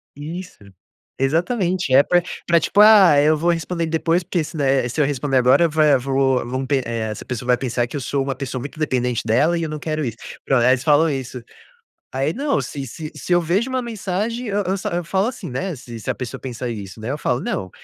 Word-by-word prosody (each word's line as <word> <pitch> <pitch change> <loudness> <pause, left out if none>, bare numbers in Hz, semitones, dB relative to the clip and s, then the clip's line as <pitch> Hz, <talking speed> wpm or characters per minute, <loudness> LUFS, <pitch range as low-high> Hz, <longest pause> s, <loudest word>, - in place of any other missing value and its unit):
Isso 165 +6 -7 0.6
exatamente 175 - 0
é 135 +2 +7
pra 175 +3 +3 0.2
pra, 170 -1 +4
tipo, 205 +4 +3
ah, 205 -8 +7
eu 155 +1 +3
vou 170 +3 0
responder 170 +1 -2
depois, 165 +2 +1
porque 175 -1 -1
se 155 +2 -8
não 145 - 0
eh, 135 -2 +2
se 125 - -4
eu 150 - +4
responder 140 -1 0
agora 130 +7 +5
vai 150 -2 +4
vou 135 0 +1 0.3
v 140 0 +2
eh, 115 0 -3
essa 105 - -7
pessoa 125 -1 -5
vai 125 0 +4
pensar 120 -2 -1
que - - -9
eu 145 - -3
sou 135 +3 -1
uma 135 0 -3
pessoa 130 0 -5
muito 140 +5 -8
dependente 125 -5 0
dela 145 +10 +2
e 165 - -2
eu 160 - -3
não 155 0 -5
quero 155 0 -3
isso, 115 -2 -5 0.3
pron 135 - +2
aí 120 +1 +4
eles 125 0 +1
falam 155 +1 +4
isso. 130 -3 -4 0.7
Aí 135 +4 -1
não, 280 +2 0
se 140 -2 -6
se 155 +5 -8
se 180 - -2
eu 175 - +4
vejo 190 +10 0
uma 260 0 -1
mensagem, 225 +1 -3
eu 205 -1 -1
eu 190 +1 -1 0.2
eu 175 - -2
falo 190 +5 0
assim, 225 -8 -6
né, 170 +8 -3
se 120 -3 -9
se - - -7
a - - 0
pessoa 125 -3 -6
pensar 125 -1 -5
isso, 100 -3 -7
né, 110 +4 -4
eu 145 - -3
falo 125 -4 -1
não, 95 - -3
145 Hz, 235 wpm, -21 LUFS, 130-175 Hz, 0.7 s, é